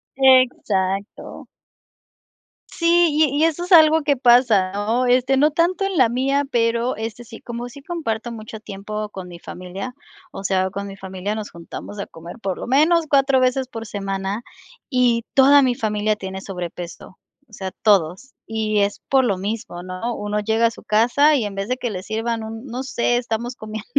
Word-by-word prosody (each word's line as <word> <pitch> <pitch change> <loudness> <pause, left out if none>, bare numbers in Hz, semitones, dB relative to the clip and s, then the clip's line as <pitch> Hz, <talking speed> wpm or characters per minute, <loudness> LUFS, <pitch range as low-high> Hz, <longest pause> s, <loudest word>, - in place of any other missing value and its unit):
Exacto. 225 -7 +1 1.2
Sí, 340 0 +3
y 295 -2 +2
y 315 - +4
eso 330 +1 0
es 360 - -8
algo 320 -1 +7
que 285 -2 +2
pasa, 240 -6 +4
¿no?, 220 +5 0
este, 255 +2 +3
no 300 +3 +4
tanto 350 +5 +1
en 385 -4 -2
la 250 -4 +5
mía, 275 +3 +1
pero 235 +1 +1
este 225 +2 -5
sí, 225 0 -11
como 240 +1 -6
sí 280 +3 -12
comparto 240 -8 -4
mucho 220 -1 -8
tiempo 210 +1 -6
con 190 -3 -8
mi 170 -1 -10
familia, 190 +9 -7 0.4
o 195 - -8
sea, 190 -1 +1
con 200 +1 -5
mi 195 0 -9
familia 190 +2 -4
nos 215 -1 -5
juntamos 170 +4 -9
a 200 - -5
comer 170 +6 -11
por 190 -3 -2
lo - - -6
menos 315 +6 +4
4 275 -1 +4
veces 255 +1 +1
por 225 -2 -7
semana 195 +1 -4 0.5
y 245 -4 +2
toda 280 +1 +7
mi 255 -2 +2
familia 215 -2 0
tiene 190 -1 -6
sobrepeso, 180 -1 -7 0.3
o - - -25
sea, 190 -2 -5
todos, 200 +4 +2
y 215 -1 -1
es 200 0 0
por 265 -1 +4
lo 200 -6 +1
mismo, 205 -2 -5
¿no?, 185 +6 -4
uno 210 0 -2
llega 225 +2 +2
a 230 - -2
su - - -13
casa 245 +8 +4
y 235 -6 0
en 200 - -5
vez 195 +2 -4
de 255 - 0
que 245 -1 -3
le 185 -3 -5
sirvan 225 +2 -2
un, 225 +2 -7
no 255 +2 -4
sé, 240 -2 0
estamos 240 0 -3
comiendo 215 -1 -7
225 Hz, 190 wpm, -21 LUFS, 200-260 Hz, 1.2 s, algo